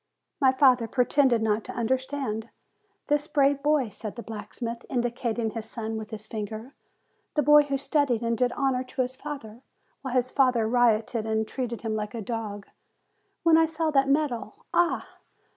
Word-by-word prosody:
My 265 Hz, -3 st, +5 dB
father 255 Hz, -3 st, +4 dB
pretended 250 Hz, -1 st, +3 dB
not 215 Hz, 0 st, +1 dB
to -, -, -7 dB
understand. 250 Hz, -2 st, -2 dB, 0.6 s
'This 295 Hz, 0 st, +1 dB
brave 280 Hz, -2 st, +2 dB
boy," 290 Hz, -4 st, +2 dB
said 210 Hz, +1 st, -7 dB
the 235 Hz, -, -7 dB
blacksmith, 230 Hz, +3 st, -6 dB
indicating 240 Hz, -2 st, -1 dB
his 225 Hz, -1 st, -6 dB
son 225 Hz, -1 st, -4 dB
with 220 Hz, -1 st, -6 dB
his 215 Hz, -2 st, -7 dB
finger; 220 Hz, +4 st, -6 dB, 0.6 s
"the 300 Hz, -, +3 dB
boy 295 Hz, +2 st, +8 dB
who 275 Hz, -1 st, -1 dB
studied 270 Hz, -4 st, +1 dB
and 230 Hz, 0 st, +1 dB
did 245 Hz, +2 st, +1 dB
honor 265 Hz, -2 st, 0 dB
to 255 Hz, 0 st, -2 dB
his 255 Hz, +1 st, -6 dB
father, 240 Hz, -5 st, -8 dB, 0.4 s
while 260 Hz, -2 st, -4 dB
his 255 Hz, 0 st, +1 dB
father 250 Hz, -5 st, +3 dB
rioted, 230 Hz, -1 st, +2 dB
and 220 Hz, 0 st, 0 dB
treated 240 Hz, -2 st, -4 dB
him 220 Hz, -1 st, -1 dB
like 210 Hz, +2 st, -4 dB
a 230 Hz, -, -4 dB
dog. 210 Hz, -2 st, -4 dB, 0.8 s
When 330 Hz, -1 st, +6 dB
I 325 Hz, -, +4 dB
saw 320 Hz, 0 st, -1 dB
that 275 Hz, -1 st, +3 dB
medal 280 Hz, -5 st, -1 dB
Ah! 345 Hz, -1 st, +2 dB
245 Hz, 170 wpm, -27 LUFS, 220-275 Hz, 0.8 s, boy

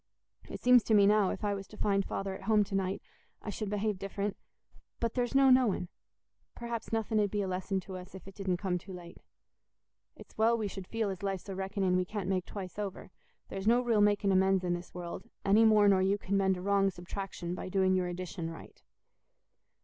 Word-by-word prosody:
It -, -, -6 dB
seems 250 Hz, -1 st, +6 dB
to 220 Hz, -, +3 dB
me 200 Hz, -1 st, +6 dB
now, 205 Hz, -1 st, +4 dB
if -, -, -5 dB
I 205 Hz, -1 st, +1 dB
was 195 Hz, -1 st, -6 dB
to 215 Hz, -, -13 dB
find 200 Hz, -1 st, +1 dB
Father 195 Hz, 0 st, -3 dB
at 190 Hz, 0 st, -9 dB
home 215 Hz, -1 st, +4 dB
to 200 Hz, -, -9 dB
night, 195 Hz, 0 st, -1 dB, 0.4 s
I 210 Hz, -, -4 dB
should 210 Hz, 0 st, -4 dB
behave 210 Hz, -1 st, -1 dB
different; 200 Hz, +1 st, -3 dB, 0.6 s
but 230 Hz, -1 st, -1 dB
there's 245 Hz, +1 st, -1 dB
no 270 Hz, -1 st, +6 dB
knowing—perhaps 235 Hz, +1 st, -2 dB
nothing 225 Hz, -1 st, 0 dB
'ud 205 Hz, -1 st, +2 dB
be 205 Hz, +1 st, -1 dB
a -, -, -2 dB
lesson 185 Hz, +1 st, -2 dB
to 185 Hz, 0 st, -8 dB
us 180 Hz, +1 st, -11 dB
if 190 Hz, 0 st, -11 dB
it 195 Hz, -, -9 dB
didn't 190 Hz, -2 st, -1 dB
come 180 Hz, -1 st, -1 dB
too 190 Hz, +2 st, -11 dB
late. 175 Hz, -1 st, -10 dB, 1.0 s
It's -, -, -15 dB
well 230 Hz, +1 st, +4 dB
we 215 Hz, -2 st, -2 dB
should 190 Hz, -2 st, -8 dB
feel 225 Hz, -3 st, -1 dB
as 190 Hz, -, -7 dB
life's 195 Hz, -1 st, -3 dB
a 195 Hz, -, -4 dB
reckoning 190 Hz, -1 st, 0 dB
we 185 Hz, 0 st, +1 dB
can't 200 Hz, -1 st, -4 dB
make 185 Hz, -2 st, -1 dB
twice 195 Hz, -1 st, -7 dB
over; 200 Hz, -1 st, -5 dB, 0.4 s
there's 195 Hz, +1 st, -4 dB
no 235 Hz, +2 st, +5 dB
real 230 Hz, -4 st, +2 dB
making 205 Hz, -1 st, +3 dB
amends 190 Hz, 0 st, +3 dB
in 175 Hz, -1 st, 0 dB
this 175 Hz, 0 st, -6 dB
world, 175 Hz, +6 st, -7 dB, 0.2 s
any 210 Hz, +3 st, +5 dB
more 215 Hz, -2 st, +6 dB
nor 195 Hz, -2 st, +5 dB
you 195 Hz, +2 st, +2 dB
can 200 Hz, -1 st, -2 dB
mend 190 Hz, -1 st, +2 dB
a -, -, -6 dB
wrong 200 Hz, 0 st, +3 dB
subtraction 175 Hz, -1 st, -6 dB
by 185 Hz, -, -5 dB
doing 190 Hz, 0 st, +2 dB
your 185 Hz, -1 st, +1 dB
addition 175 Hz, -1 st, -5 dB
right." 165 Hz, -, -11 dB
195 Hz, 220 wpm, -31 LUFS, 185-210 Hz, 1.0 s, seems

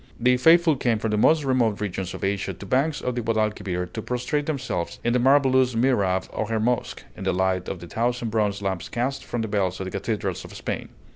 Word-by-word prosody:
The 125 Hz, +1 st, +4 dB
faithful 165 Hz, +2 st, +5 dB
came 120 Hz, -3 st, +1 dB
from 110 Hz, 0 st, -2 dB
the 105 Hz, -, +1 dB
most 155 Hz, +8 st, +4 dB
remote 125 Hz, -6 st, +1 dB
regions 95 Hz, -3 st, -3 dB
of -, -, -8 dB
Asia 100 Hz, 0 st, -1 dB
to -, -, -10 dB
banks 140 Hz, +8 st, +1 dB
of 125 Hz, -, -1 dB
the 120 Hz, -, -2 dB
Guadalquivir 105 Hz, -5 st, -1 dB
to 110 Hz, -, -4 dB
prostrate 125 Hz, +5 st, -2 dB
themselves 130 Hz, -, -3 dB
in 120 Hz, -, +1 dB
the 125 Hz, -, +3 dB
marvelous 130 Hz, -1 st, +4 dB
Mihrab 105 Hz, -7 st, +2 dB
of 110 Hz, -, -2 dB
her 110 Hz, -1 st, 0 dB
mosque, 120 Hz, +2 st, -1 dB
in -, -, -8 dB
the 95 Hz, -, +1 dB
light 95 Hz, 0 st, 0 dB
of 95 Hz, -, -4 dB
the 85 Hz, -, -8 dB
thousand 120 Hz, +3 st, -1 dB
bronze 105 Hz, -2 st, 0 dB
lamps 95 Hz, -3 st, -2 dB
cast 130 Hz, +3 st, -2 dB
from 120 Hz, -2 st, -3 dB
the -, -, -2 dB
bells 95 Hz, -3 st, -1 dB
of 95 Hz, -, -3 dB
the 95 Hz, -, -5 dB
cathedrals 100 Hz, -2 st, -3 dB
of -, -, -11 dB
Spain. -, -, -4 dB
115 Hz, 225 wpm, -24 LUFS, 100-125 Hz, -, faithful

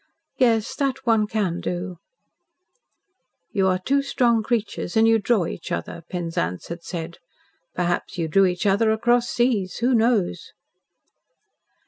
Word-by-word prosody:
"Yes. 235 Hz, -1 st, +2 dB
That 270 Hz, -2 st, -1 dB
one 225 Hz, -3 st, +3 dB
can 200 Hz, -6 st, -1 dB
do." 180 Hz, 0 st, -4 dB, 1.5 s
"You 195 Hz, -3 st, +2 dB
are 185 Hz, -1 st, +2 dB
two 275 Hz, +10 st, +1 dB
strong 240 Hz, -4 st, +2 dB
creatures 220 Hz, -4 st, -2 dB
and 225 Hz, 0 st, +5 dB
you 225 Hz, 0 st, +4 dB
draw 205 Hz, -3 st, +1 dB
each -, -, -7 dB
other," 85 Hz, -, -4 dB
Penzance 165 Hz, -, -3 dB
had 170 Hz, 0 st, -6 dB
said. 170 Hz, -1 st, -6 dB, 0.6 s
"Perhaps 175 Hz, 0 st, -1 dB
you 165 Hz, -2 st, -1 dB
drew 195 Hz, +5 st, +4 dB
each 180 Hz, +2 st, -2 dB
other 205 Hz, +3 st, +3 dB
across 240 Hz, +2 st, +2 dB
seas. 230 Hz, -7 st, 0 dB
Who 245 Hz, +2 st, +1 dB
knows?" 225 Hz, -, +1 dB
210 Hz, 135 wpm, -23 LUFS, 180-235 Hz, 1.5 s, and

